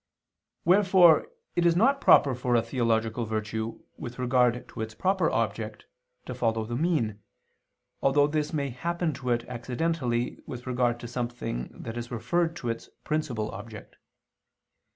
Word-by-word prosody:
Wherefore 185 -3 +6 0.3
it 175 - +2
is 170 -1 +4
not 270 +9 +3
proper 140 - +6
for 125 0 0
a 115 - +3
theological 115 -1 0
virtue, 110 +1 -3
with 125 -4 -7
regard 125 -1 +2
to 115 - -7
its 110 0 -5
proper 190 - +2
object, - - -2 0.4
to - - -5
follow 115 -2 0
the 120 +2 -4
mean, 125 -9 0 0.8
although 145 +1 +4
this 150 0 -1
may 140 -3 -1
happen 170 +5 -2
to 130 -2 -5
it 120 -1 +1
accidentally 125 0 -2
with 125 -1 -7
regard 120 -2 +1
to 120 - -6
something 120 - -3 0.2
that 115 +1 -5
is 120 0 -6
referred 165 +8 0
to 120 -8 -4
its 115 - -4
principal 135 -9 -2
object. 105 +2 -10
125 Hz, 150 wpm, -27 LUFS, 115-155 Hz, 0.8 s, Wherefore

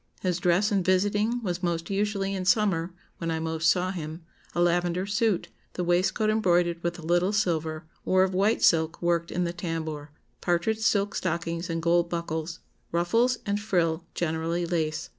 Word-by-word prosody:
His 180 -2 0
dress 180 +5 +2
in 200 -2 +2
visiting 205 +6 +1
was 180 -3 -2
most 170 0 -2
usually, 195 -1 0
in 190 -1 -2
summer, 185 -3 +2 0.3
when 165 - -2
I 160 0 -1
most 160 0 +1
saw 185 +1 +2
him, 160 -2 -6 0.3
a - - 0
lavender 175 +1 +2
suit, 205 -2 0 0.2
the 180 - -2
waistcoat 180 +5 +2
embroidered 175 -5 +2
with 170 0 -2
a 170 - -10
little 175 +4 +2
silver, 160 -6 -1 0.2
or 185 0 +3
of 190 0 0
white 200 +4 +2
silk 160 -1 +3
worked 170 -1 0
in 180 - 0
the 170 0 -2
tambour, 160 -4 -4 0.3
partridge 175 +5 +1
silk 205 -2 +1
stockings, 170 0 -2
and 165 0 -2
gold 170 0 +3
buckles, 165 -1 -4 0.3
ruffles 230 +9 +2
and 205 -1 0
frill 170 -5 0
generally 165 +1 -1
lace. 160 -3 -2
175 Hz, 170 wpm, -27 LUFS, 165-195 Hz, 0.3 s, or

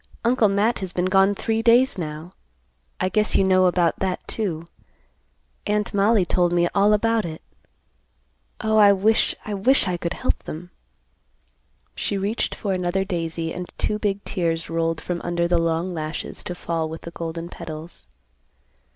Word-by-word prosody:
Uncle 235 -2 +4
Matt 205 +4 +1
has 190 -2 -4
been 180 - 0
gone 195 +2 +4
three 225 +2 -1
days 240 +3 +4
now. 160 0 -6 0.7
I - - +1
guess 215 +2 +1
you - - +5
know 185 -1 +4
about 175 -2 +1
that, 190 -1 -2
too. 170 -7 -3 1.0
Aunt 210 0 0
Mollie 200 0 +3
told 175 0 +1
me 175 0 +3
all 205 +1 +4
about 225 +1 +2
it. 160 -3 -6 1.2
Oh, 220 -1 +1
I 205 -1 +7
wish, 215 +3 +2
I 210 - -4
wish 225 +7 +4
I 180 -1 -1
could 170 0 -3
help - - -1
them." 175 +3 -7 1.2
She 200 - -2
reached 205 +4 -1
for 200 -2 -2
another 185 +1 0
daisy 165 -3 -3
and 180 0 -6
two 210 - -1
big 200 -1 -1
tears 165 -3 -2
rolled 165 0 0
from 175 -1 -3
under 170 0 0
the 175 -1 +2
long 165 +2 -1
lashes 155 -1 -4
to 180 -3 -4
fall 165 -2 -2
with 160 0 -7
the 170 - -8
golden 165 0 -5
petals. 165 -1 -9
185 Hz, 165 wpm, -23 LUFS, 170-205 Hz, 1.2 s, I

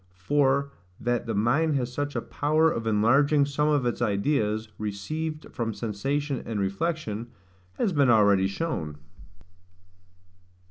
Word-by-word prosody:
For 140 +6 +1 0.3
that 120 0 -1
the 115 - -2
mind 145 +9 +2
has 125 -2 -2
such 145 +1 -3
a - - -2
power 155 +2 +2
of 115 -1 -3
enlarging 140 +7 +4
some 145 +1 0
of 145 -4 +2
its 120 - -1
ideas, 110 0 0
received 155 +10 -4
from 115 -3 -3
sensation 135 +6 -2
and 110 -3 -3
reflection, 110 - -2 0.5
has 185 - 0
been 140 -4 +3
already 100 -4 +5
shown. 95 - -3
125 Hz, 130 wpm, -26 LUFS, 105-145 Hz, 0.5 s, already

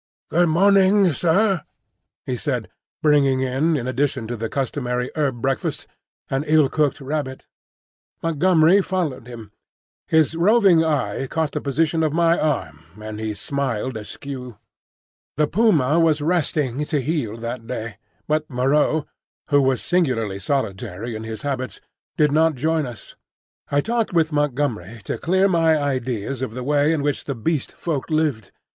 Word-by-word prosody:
"Good 175 +1 +3
morning, 195 +1 +4
sair," 180 +3 +2 0.6
he 130 - -2
said, 125 -4 -2 0.3
bringing 140 -3 +4
in, 135 +5 +1
in 120 - -4
addition 130 -1 -1
to 120 - -2
the 115 0 -4
customary 125 -1 -2
herb 135 -6 -1
breakfast, 135 -1 -1 0.4
an 135 +1 -1
ill 155 -3 +4
cooked 150 -2 0
rabbit. 135 -1 -4 0.8
Montgomery 165 +3 +4
followed 160 -11 -3
him. 115 -4 -10 0.6
His 160 -1 +3
roving 185 -1 +4
eye 135 -6 -1
caught 160 +1 -1
the - - -3
position 160 +4 0
of 155 -2 +1
my 170 0 +3
arm 80 - -2 0.2
and 110 0 -7
he 110 -1 -3
smiled 130 +1 -2
askew. 125 +2 -7 0.8
The 150 - +3
puma 165 - +3
was 160 -2 +3
resting 150 -4 0
to 150 -1 0
heal 135 -6 -2
that 115 0 -6
day; 110 -3 -5 0.3
but 155 0 0
Moreau, 145 +4 +1 0.4
who 145 -1 +4
was 130 -2 +1
singularly 125 - 0
solitary 110 -3 -3
in 110 +1 -6
his 110 -1 -6
habits, 130 -5 -3 0.4
did 150 -2 +3
not 160 +1 +3
join 155 +2 0
us. 120 -3 -10 0.5
I 145 0 +2
talked 230 0 -1
with 165 -2 +2
Montgomery 125 -8 -1
to - - -4
clear 190 +3 +2
my 165 -4 +3
ideas 130 -3 -2
of 120 -3 -4
the 125 - -4
way 145 +2 +2
in 155 -3 0
which 145 -1 -1
the 140 - -3
Beast 140 +5 -2
Folk 155 -6 -3
lived. 150 -10 0
145 Hz, 150 wpm, -22 LUFS, 125-160 Hz, 0.8 s, morning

